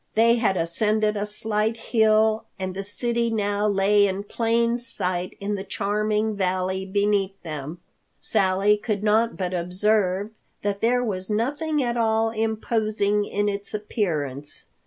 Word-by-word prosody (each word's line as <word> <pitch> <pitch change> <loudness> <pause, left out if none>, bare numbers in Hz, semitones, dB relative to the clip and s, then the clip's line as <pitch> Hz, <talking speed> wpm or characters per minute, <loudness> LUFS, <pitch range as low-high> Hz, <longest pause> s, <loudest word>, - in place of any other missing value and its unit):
They 230 +2 +5
had 215 -5 +1
ascended 210 +6 +1
a 205 0 -2
slight 215 +1 -1
hill, 220 -1 +2
and 185 -1 -4
the 195 +1 -4
city 235 +3 -1
now 205 -1 0
lay 205 0 +4
in 195 +1 -3
plain 230 +2 +1
sight 180 -6 -3
in 200 +1 -2
the 195 -1 -3
charming 210 +2 -1
valley 185 0 -1
beneath 200 0 0
them. 155 0 -6 0.4
Sally 195 +2 +2
could 210 -1 -3
not 220 +2 +2
but 185 -1 -2
observe 190 +3 0 0.3
that 200 -1 -1
there 245 +2 +2
was 190 -4 -3
nothing 285 +7 0
at 240 -1 -1
all 225 -1 +2
imposing 215 -2 0
in 205 0 -1
its 200 0 -3
appearance. 150 - -3
210 Hz, 140 wpm, -24 LUFS, 195-220 Hz, 0.4 s, They